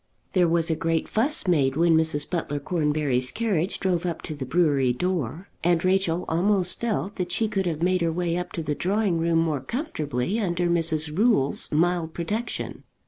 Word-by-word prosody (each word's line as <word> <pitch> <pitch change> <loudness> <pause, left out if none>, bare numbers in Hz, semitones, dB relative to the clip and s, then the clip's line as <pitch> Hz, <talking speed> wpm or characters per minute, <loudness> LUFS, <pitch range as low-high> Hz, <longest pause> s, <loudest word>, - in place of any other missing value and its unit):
There 180 -2 +4
was 165 0 +2
a - - +1
great 165 0 -1
fuss 255 +1 +1
made 140 -6 +2
when 165 +1 +4
Mrs. 160 -2 +1
Butler 155 -5 -2
Cornbury's 150 -5 0
carriage 200 -6 -1
drove 180 -3 0
up 175 -2 -3
to 155 - -5
the 140 -3 -6
brewery 140 -5 +2
door, 170 - -3
and 170 0 +2
Rachel 185 -2 +1
almost 185 +2 +1
felt 210 -3 -2
that 180 -2 -3
she 225 - +1
could 195 -3 -1
have 165 -1 -2
made 185 0 +2
her 165 -1 +1
way 170 0 -1
up 180 0 -4
to 165 - -3
the 150 -1 -1
drawing 190 +1 0
room 165 0 +1
more 160 -4 0
comfortably 155 - -3
under 175 -4 0
Mrs. 160 -3 +2
Rule's 210 - +2
mild 165 +1 +1
protection. 210 +8 -3
170 Hz, 185 wpm, -25 LUFS, 155-185 Hz, -, There